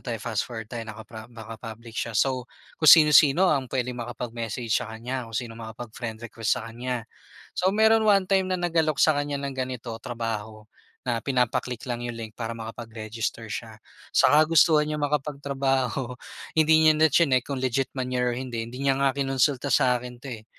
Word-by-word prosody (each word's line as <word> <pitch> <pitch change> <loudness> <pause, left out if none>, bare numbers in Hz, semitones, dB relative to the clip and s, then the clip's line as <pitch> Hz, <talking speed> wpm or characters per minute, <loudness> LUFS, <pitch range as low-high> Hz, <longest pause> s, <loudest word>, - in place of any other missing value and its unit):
tayo, 120 -3 -3
fast 115 -3 -2
forward 110 -2 -6
na 120 - -3
tayo, - - -6
nakapra 110 +1 -9
naka 115 -1 -9
public 115 0 -9
siya. 115 - -2
So, 130 +3 +1 0.4
kung 155 - +5
sino-sino 155 +2 +6
ang 130 -4 -1
pwedeng 125 -1 -2
makapag-message 115 -1 -4
sa 120 0 +1
kanya, 120 +3 -4
kung 115 - -5
sino 115 -1 -3
makapag-friend 110 0 -7
request 115 -1 0
sa 115 - -8
kanya. 125 0 -4 0.5
So, 185 - +2
meron 220 +1 +4
one 195 -2 +5
time 190 -1 +2
na - - +1
nag-alok 160 -4 +1
sa 155 - +6
kanya 145 0 -1
ng 140 -1 -4
ganito, 125 -2 -4
trabaho, 110 -2 -5 0.4
na 120 -2 -1
pinapa-click 125 -1 -1
lang 120 -1 -2
yung 120 -1 -4
link 110 -2 -7
para 115 -1 -4
makapag-register 115 0 -5
siya, 110 +2 -6 0.4
sa - - +5
kagustuhan 155 -1 +4
niyang 150 -1 -1
makapagtrabaho, 135 -3 -1 0.4
hindi 160 0 +5
niya - - +8
na 160 +1 +5
chineck 130 -7 +3
kung 140 -2 -4
legit 130 +1 -1
man 130 -2 -3
yan 125 -1 0
or 125 - +1
hindi. 120 -3 -4
Hindi 130 +4 -3
niya 135 - +3
nga 135 -1 +3
kinonsulta 135 0 0
sa 125 -1 +3
akin 125 0 -9
'to, 125 +3 -11
eh. 110 -2 -9
125 Hz, 185 wpm, -25 LUFS, 115-140 Hz, 0.5 s, niya